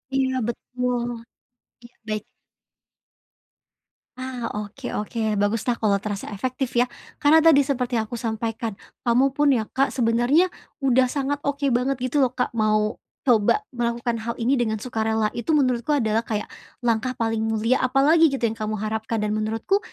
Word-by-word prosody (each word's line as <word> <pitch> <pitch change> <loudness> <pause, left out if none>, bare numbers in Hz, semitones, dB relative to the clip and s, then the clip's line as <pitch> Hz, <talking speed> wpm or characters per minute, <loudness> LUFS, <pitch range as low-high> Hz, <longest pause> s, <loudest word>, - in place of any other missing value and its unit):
Iya, 265 -1 +1
betul. 250 +1 -2 0.8
Iya, 240 +1 -15
baik. 215 -1 -2 2.0
Ah, 255 -3 -4
oke 210 +5 -6
oke, 215 +2 -5 0.2
bagus 205 +2 +1
lah, 245 - +2
kalau 210 -3 +2
terasa 205 -2 -4
efektif, 255 +4 -3
ya. 240 +1 +4 0.4
Karena 310 +2 +6
tadi 315 -3 +6
seperti 255 -3 -1
yang 225 - +2
aku 240 - -4
sampaikan, 225 -1 -3 0.3
kamu 240 +3 +4
pun 290 +2 +1
ya, 225 - +1
Kak, 270 +1 +2
sebenarnya 250 +9 +3 0.3
udah 260 -1 +4
sangat 280 +2 -2
oke 285 0 -2
banget 250 +3 +1 0.2
gitu 295 - +2
loh, 260 -3 +3
Kak, 250 - 0
mau 215 -1 +1 0.2
coba 245 - +3
melakukan 235 -1 -1
hal 230 +1 -4
ini 250 +3 +1
dengan 220 -3 -1
sukarela. 220 -3 0
Itu, 240 +7 0
menurutku 255 0 +2
adalah 225 -3 0
kayak 210 -2 -2 0.3
langkah 240 +2 0
paling 225 -1 -1
mulia, 225 +3 +1
apa 255 +1 +1
lagi, 325 +3 +6
gitu, 275 -4 -3
yang 225 -1 +1
kamu 215 0 -2
harapkan, 220 +1 -2
dan 210 - 0
menurutku, 220 - 0
240 Hz, 160 wpm, -24 LUFS, 220-265 Hz, 2.0 s, Karena